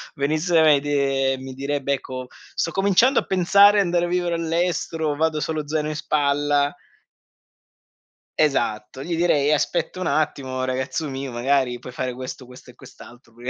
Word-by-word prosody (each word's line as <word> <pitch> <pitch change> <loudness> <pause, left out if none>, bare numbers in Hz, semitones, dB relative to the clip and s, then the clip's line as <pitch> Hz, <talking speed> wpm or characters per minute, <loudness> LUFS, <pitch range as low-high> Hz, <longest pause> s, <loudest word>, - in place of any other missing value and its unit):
venisse 155 +5 -1
da 160 - +6
me 150 -3 +5
de 135 -2 0
e - - -4
mi 130 0 -8
direbbe: 140 +1 -2
"Ecco 130 -1 -5 0.3
sto 165 - -1
cominciando 200 +7 +3
a - - -5
pensare 200 +3 +5
andare 175 -1 +1
a - - -3
vivere 175 -1 0
all'estero, 165 -2 -1
vado 160 0 0
solo 155 -2 -3
zaino 155 0 -1
in 155 - -4
spalla." 145 0 +1 1.7
Esatto, 130 -4 -1
gli 170 0 -3
direi: 150 -4 +2
"Aspetta 165 +3 -1
un 185 - -2
attimo 130 -4 -1
ragazzo 130 +4 -2
mio, 135 0 -5
magari 125 +1 0
puoi 125 +1 -10
fare 125 0 -3
questo, 130 0 -8
questo 125 0 -15
e - - -13
quest'altro 120 -1 -15
prima 120 +2 -6
145 Hz, 165 wpm, -22 LUFS, 130-165 Hz, 1.7 s, da